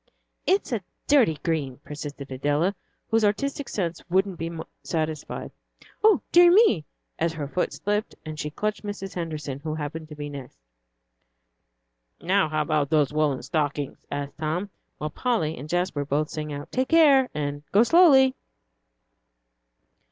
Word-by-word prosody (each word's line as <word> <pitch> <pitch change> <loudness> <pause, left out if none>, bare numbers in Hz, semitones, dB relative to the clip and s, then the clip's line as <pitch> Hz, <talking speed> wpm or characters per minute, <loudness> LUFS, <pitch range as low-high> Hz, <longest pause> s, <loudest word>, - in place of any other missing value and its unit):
"It's 385 -5 +2
a 230 -4 0 0.2
dirty 255 - +4
green," 145 -6 -1
persisted 145 -1 -8
Adela, 145 +8 +1 0.4
whose 225 0 +3
artistic 275 +7 0
sense 175 -4 -2
wouldn't 190 0 +1
be 165 +1 -3 0.3
satisfied. 155 -2 -3 0.5
"O 435 -1 +5
dear 350 0 +8
me!" 355 - +5 0.3
as 165 0 +1
her 150 -3 -4
foot 180 +5 -1
slipped 210 +2 -2
and 155 -1 -6
she 150 - -2
clutched 210 +7 -2
Mrs. 205 -2 -6
Henderson, 155 -5 -4
who 155 +1 -4
happened 155 +1 -5
to 150 - -9
be 145 0 -5
next. 140 -3 -9 1.6
"Now, 190 -2 +2
how 155 0 0
about 150 -2 0
the 150 -2 +3
woollen 150 -3 +1
stockings?" 145 -3 -2
asked 145 +1 -5
Tom, 170 +6 -2 0.3
while 150 0 -4
Polly 165 -8 0
and 150 +1 -9
Jasper 175 -4 0
both 145 +2 -1
sang 150 -1 -4
out, 145 0 -7
"Take 260 0 0
care," 285 -6 +6
and 145 -1 -3
"Go 210 +3 +6
slowly." 270 -4 +6
160 Hz, 145 wpm, -25 LUFS, 150-210 Hz, 1.6 s, dear